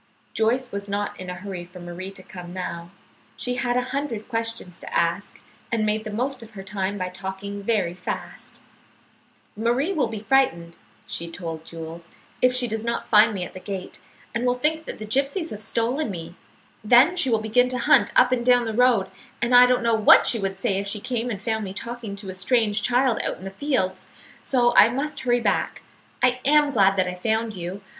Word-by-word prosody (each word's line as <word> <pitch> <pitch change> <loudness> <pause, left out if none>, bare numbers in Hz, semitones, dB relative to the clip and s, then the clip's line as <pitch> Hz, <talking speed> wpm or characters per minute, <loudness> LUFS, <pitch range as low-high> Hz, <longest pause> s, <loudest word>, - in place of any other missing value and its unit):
Joyce 245 +3 +1
was 200 0 -5
not 205 0 -3
in 185 0 -6
a 180 - -4
hurry 185 -1 -6
for 180 +1 -13
Marie 175 +2 -7
to 195 -1 -10
come 180 -2 -10
now. 170 -2 -5 0.5
She 250 - -2
had 245 0 0
a - - +3
hundred 275 -6 -3
questions 230 -6 -4
to - - -9
ask, 170 +4 -1 0.3
and 225 -2 +1
made 215 +1 0
the - - -4
most 255 +4 -2
of 225 - -11
her 195 - -6
time 195 0 -3
by 185 -1 -3
talking 190 +2 -6
very 200 -5 0
fast. 180 0 -7 0.9
"Marie 240 - 0
will 285 -9 +1
be 220 -2 -6
frightened," 210 -10 +1 0.3
she 170 0 -3
told 165 -2 -6
Jules, 165 +1 -9 0.3
"if 255 - +5
she 250 -1 +1
does 220 -1 -3
not 235 0 -3
find 210 +1 +6
me 190 -4 -3
at - - -8
the 185 - -8
gate, 190 -1 -6 0.3
and 235 - -1
will 245 0 +2
think 315 +5 0
that - - -6
the 215 - -7
gypsies 275 - -1
have 210 - -7
stolen 235 +6 -1
me. 170 -3 -6 0.5
Then 245 +10 +6
she 350 -7 +2
will 225 - +3
begin 220 +3 +2
to 255 - -2
hunt 235 - +4
up 250 0 +5
and 250 -2 +1
down 245 0 +4
the 225 - -3
road, 235 -4 +3 0.3
and 240 +1 0
I 245 0 +9
don't 250 -1 +2
know 230 0 +2
what 220 -1 +7
she 230 - +1
would 195 -1 -3
say 195 0 0
if 200 - -4
she 210 +1 -3
came 245 +2 -2
and 210 -5 -4
found 220 +1 -2
me 190 -2 -5
talking 235 -2 -5
to 200 -1 -8
a - - -8
strange 210 +1 +1
child 245 +1 +2
out - - -2
in - - -13
the 195 - -6
fields, 195 -6 -1 0.3
so 240 -2 +2
I 220 - +8
must 285 +4 -3
hurry 245 -2 +1
back. - - -1 0.4
I 250 0 +3
am 295 +1 +4
glad 195 -5 +4
that 185 -1 +1
I 180 - -3
found 220 +4 -1
you. 180 +3 -6
220 Hz, 215 wpm, -24 LUFS, 190-245 Hz, 0.9 s, I